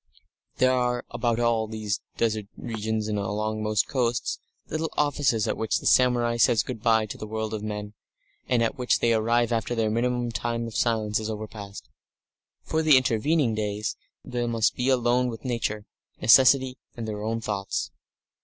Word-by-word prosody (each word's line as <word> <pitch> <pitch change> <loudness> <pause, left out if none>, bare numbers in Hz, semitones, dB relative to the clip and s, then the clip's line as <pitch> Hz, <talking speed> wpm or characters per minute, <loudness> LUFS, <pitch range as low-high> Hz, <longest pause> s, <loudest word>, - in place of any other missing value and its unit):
There 130 0 +4
are, 125 -1 0
about 120 -1 0
all 115 -2 +1
these 110 -2 -3 0.2
desert 110 -3 0
regions 110 -2 -3
and 105 -1 -1
along 105 +2 -2
most 105 -1 +1
coasts, 120 -2 -1 0.3
little 155 +1 -2
offices 140 -7 +1
at - - 0
which 110 - 0
the - - -8
samurai 120 -2 +3
says 115 -1 +4
good 120 -4 -6
bye 110 -1 +3
to 105 - -8
the 110 - -6
world 110 0 -3
of 110 - -3
men, 105 -1 -5 0.6
and 120 -2 +3
at 115 - -2
which 125 - +2
they 115 - +2
arrive 115 +2 +2
after 115 +1 -1
their 110 -2 +1
minimum 120 +1 0
time 115 0 -2
of 115 - -8
silence 110 -3 +1
is 110 0 -4
overpast. 105 -2 -7 0.8
For 160 - 0
the 155 -4 +6
intervening 130 +2 +1
days 105 -1 -2 0.3
they 120 -1 -2
must 115 -2 +1
be 125 +1 0
alone 125 -1 +2
with 115 0 -7
Nature, 110 -4 -2 0.3
necessity, 130 +1 +5 0.2
and 115 -1 -4
their 105 -1 -4
own 115 +2 -2
thoughts. 100 -3 -3
115 Hz, 175 wpm, -26 LUFS, 110-125 Hz, 0.8 s, the